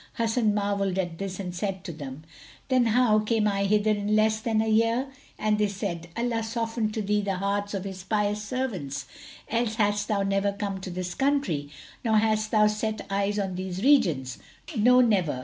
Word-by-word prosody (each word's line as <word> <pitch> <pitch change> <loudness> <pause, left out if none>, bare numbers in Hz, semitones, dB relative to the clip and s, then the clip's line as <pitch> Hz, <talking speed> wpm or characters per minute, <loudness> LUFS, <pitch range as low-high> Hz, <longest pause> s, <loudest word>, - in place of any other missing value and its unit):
Hasan 225 -2 +1
marvelled 200 -2 0
at 175 -3 -2
this 195 -1 -4
and 180 -2 -4
said 190 +1 -3
to - - -5
them, 145 -2 -8 0.5
"Then 255 -2 +3
how 225 -1 +4
came 215 0 +1
I 200 -1 +1
hither 210 +1 +3
in 205 0 0
less 215 0 +3
than 220 -1 0
a 220 - +1
year?"; 230 +4 +2 0.3
and 215 0 +1
they 210 - +3
said, 190 -4 -4
"Allah 235 -1 0
softened 225 -1 -2
to 220 - -1
thee 210 +1 +1
the 200 -1 -1
hearts 200 +2 -1
of 190 - -3
His 190 -2 -7
pious 210 +1 0
servants 195 - -3 0.4
else 230 -1 0
hadst 205 -1 +1
thou 200 -2 +1
never 195 0 +1
come 200 -1 -3
to 190 - -6
this 180 0 -4
country 265 - 0 0.3
nor 220 -2 +3
hadst 215 0 +2
thou 215 -1 +4
set 215 +1 -1
eyes 200 +1 0
on 195 -2 -1
these 185 +1 -4
regions; 160 - +3 0.4
no, 250 +3 +6
never! 190 - +2
210 Hz, 190 wpm, -26 LUFS, 190-220 Hz, 0.5 s, no